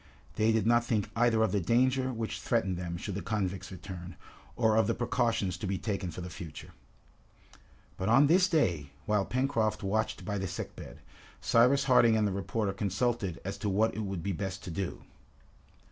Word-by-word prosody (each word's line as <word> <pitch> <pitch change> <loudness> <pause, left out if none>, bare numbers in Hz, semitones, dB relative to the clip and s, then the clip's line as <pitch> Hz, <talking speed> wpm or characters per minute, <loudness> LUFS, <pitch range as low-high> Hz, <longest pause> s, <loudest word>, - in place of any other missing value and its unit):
They 110 +1 +3
did 110 -2 +1
not 120 +1 +4
think 105 -4 -1
either 115 -1 +3
of 110 - +1
the 100 - +1
danger 130 +7 +2
which 115 -2 -4
threatened 100 -6 0
them 85 -1 -4
should 100 +3 -5
the 100 - -3
convicts 95 -3 -3
return, 90 -2 -8 0.4
or 110 -2 +3
of 110 - +3
the 115 - +1
precautions 120 -7 0
to 100 - -4
be 95 0 -1
taken 100 -3 -3
for 85 +2 -7
the 90 - -6
future. 80 -2 -9 1.3
But 95 +3 -1
on 135 +5 +6
this 180 +5 +5
day, 85 - +1 0.2
while 105 -2 +1
Pencroft 120 -5 0
watched 110 +3 -1
by 105 -1 -2
the 95 - -2
sick - - -6
bed, - - -10 0.4
Cyrus 125 +4 +4
Harding 120 -4 +5
and 110 - +2
the - - -1
reporter 100 +1 -2
consulted 100 -1 -1
as 95 +1 -4
to 105 - -1
what 105 +3 +2
it - - -5
would 95 -5 -4
be 100 - -1
best 95 +1 -4
to 90 - -6
do. 95 +2 -4
105 Hz, 190 wpm, -30 LUFS, 95-115 Hz, 1.3 s, on